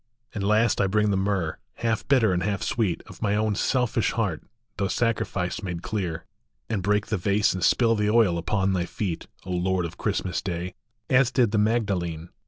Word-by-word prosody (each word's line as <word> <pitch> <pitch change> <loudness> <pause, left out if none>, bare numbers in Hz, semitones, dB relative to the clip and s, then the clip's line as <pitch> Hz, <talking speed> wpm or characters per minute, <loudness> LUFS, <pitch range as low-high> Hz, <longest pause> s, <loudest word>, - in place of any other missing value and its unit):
And 105 - -3
last 105 +1 +3
I 100 - +3
bring 105 +1 +2
the - - +2
myrrh, 95 -4 -1 0.2
half 115 -2 -1
bitter 120 -8 +4
and 90 - 0
half 100 +1 -1
sweet, 105 -8 -1
Of - - -13
my 105 -1 +1
own 105 0 +1
selfish 120 +3 +1
heart, 105 -9 -1 0.3
through 100 -1 -1
sacrifice 105 -6 -1
made 90 -3 -5
cleai 90 -7 -3 0.5
And 105 -4 0
break 105 +2 +1
the 105 - -1
vase 100 +3 +2
and 95 -1 -3
spill 115 -2 +4
the 105 -1 +1
oil 105 -6 +4
upon 95 +3 0
thy 90 -2 0
feet, 95 -7 -4 0.2
O 90 - -5
Lord 90 0 0
of 85 +2 -8
Christmas 95 -4 -1
Day, 90 -1 -4 0.3
as 130 -1 +4
did 120 -4 +2
the 105 - +2
Magdalene. 95 -7 0
100 Hz, 190 wpm, -25 LUFS, 90-110 Hz, 0.5 s, bitter